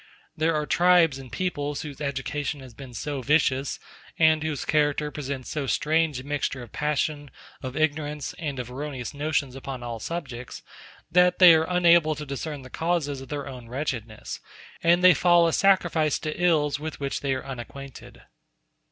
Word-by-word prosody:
There 160 +1 +1
are 150 -1 0
tribes 170 -3 +4
and 130 -3 -11
peoples 145 -3 -2
whose 150 -1 -8
education 145 +1 -3
has 130 -3 -12
been 125 0 -11
so 145 0 -3
vicious, 140 -1 +1 0.4
and 160 -1 +4
whose 155 -2 -3
character 150 -1 +1
presents 135 -3 -5
so 145 -3 -2
strange 155 0 +1
a - - -8
mixture 140 -2 -2
of 120 - -13
passion, 150 -1 -1 0.3
of 130 +1 -5
ignorance, 150 -2 -1
and 145 -4 -3
of 125 -1 -5
erroneous 135 -1 -5
notions 145 -2 -1
upon 135 -2 -6
all 120 -1 -5
subjects, 130 -5 -6 0.5
that 180 0 +4
they 180 -3 +9
are 160 +1 +2
unable 170 -3 +4
to 150 0 -6
discern 140 +1 -5
the 130 - -12
causes 160 -5 -1
of 135 - -11
their 145 -1 -4
own 125 -4 -9
wretchedness, 120 -5 -4 0.4
and 170 +2 +4
they 185 0 +9
fall 175 +2 +5
a 165 - 0
sacrifice 175 -6 +3
to 155 -1 -4
ills 150 -4 +2
with 155 0 -6
which 140 -1 -2
they 135 -2 -1
are 130 - -6
unacquainted. 135 +1 -9
145 Hz, 170 wpm, -26 LUFS, 135-160 Hz, 0.5 s, they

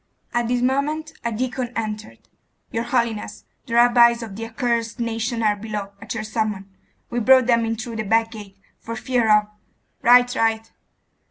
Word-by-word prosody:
At 240 -1 0
this 245 0 0
moment 300 +4 -1
a 235 - -1
deacon 250 +2 -3
entered.... 215 -1 -5 0.4
'Your 230 +1 -2
holiness, 235 -4 -2 0.2
the 230 - -3
rabbis 235 0 +5
of 210 -4 -8
the 225 +2 -5
accursed 230 0 -2
nation 230 0 -2
are 210 -1 +3
below, 205 -1 -5
at 205 - -6
your 220 - -3
summons. 215 -3 -2 0.5
We 240 - -1
brought 260 +2 +5
them 235 -1 +3
in 225 0 -1
through 225 +1 -6
the 220 - -2
back 225 +2 +1
gate, 205 -3 -11 0.2
for 230 - -6
fear 240 0 0
of 210 0 +5 0.3
' - - -46
'Right, 245 +1 +5
right. 225 -1 0
230 Hz, 175 wpm, -22 LUFS, 220-240 Hz, 0.5 s, rabbis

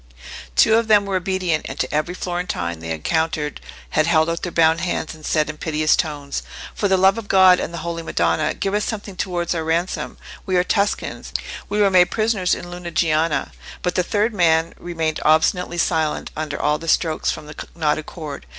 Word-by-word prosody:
Two 220 - +5
of 230 -1 0
them 210 -2 +5
were 195 -1 0
obedient, 185 -3 -1
and - - -7
to - - -1
every 155 +4 -1
Florentine 175 - -3
they 80 - -8
had 80 - -1
encountered 155 - -1 0.3
had 155 - +2
held 160 0 +3
out 170 - -3
their 180 - -4
bound 165 0 +3
hands 175 -2 -2
and 155 -1 -15
said 155 0 +1
in 155 0 -6
piteous 155 -1 +2
tones— 145 -3 -3 0.3
"For 205 - 0
the 190 -1 +3
love 190 +3 +4
of 215 - -9
God 185 -2 +6
and - - -3
the 170 - -6
Holy 170 -1 -3
Madonna, 85 - 0
give 195 - -2
us 210 0 +1
something 205 -3 -5
towards 175 -2 -2
our 165 -2 -2
ransom! 165 +3 -2 0.3
We 185 - 0
are 180 - +4
Tuscans: 200 +2 -1 0.4
we 205 +1 -1
were 200 -2 +4
made 180 -1 +5
prisoners 215 -5 +1
in - - -8
Lunigiana." 165 -3 0 0.3
But 180 - 0
the 180 - +2
third 210 +5 0
man 165 -3 +2
remained 165 -3 -2
obstinately 170 +3 +2
silent 160 -3 0
under 150 -2 -4
all 150 0 +1
the 165 - -8
strokes 160 -1 +1
from - - -3
the 150 - -9
knotted 155 -2 0
cord. 150 -4 -8
170 Hz, 200 wpm, -21 LUFS, 155-185 Hz, 0.4 s, God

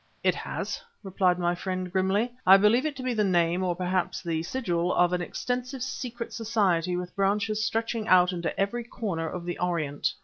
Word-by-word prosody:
"It - - +4
has," - - -4 0.2
replied 185 -2 +1
my 175 -1 +1
friend 185 0 -4
grimly. 195 +5 +1
"I 190 +1 +8
believe 225 +8 +4
it 295 - -4
to 260 - -7
be 255 -1 0
the 215 -2 +1
name, 175 -2 +2
or 180 -1 0
perhaps 180 0 -1
the 165 -2 -1
sigil, 175 -4 -1
of 175 0 +3
an 180 - 0
extensive 250 +7 -3
secret 240 -2 -5
society 190 -6 +1
with 180 0 -5
branches 205 +2 +1
stretching 225 0 -1
out 180 0 +5
into 170 -2 -3
every 200 +5 0
corner 190 -9 -3
of 180 -2 -6
the 175 - -4
Orient." 165 -5 -1
190 Hz, 190 wpm, -27 LUFS, 175-225 Hz, 0.2 s, I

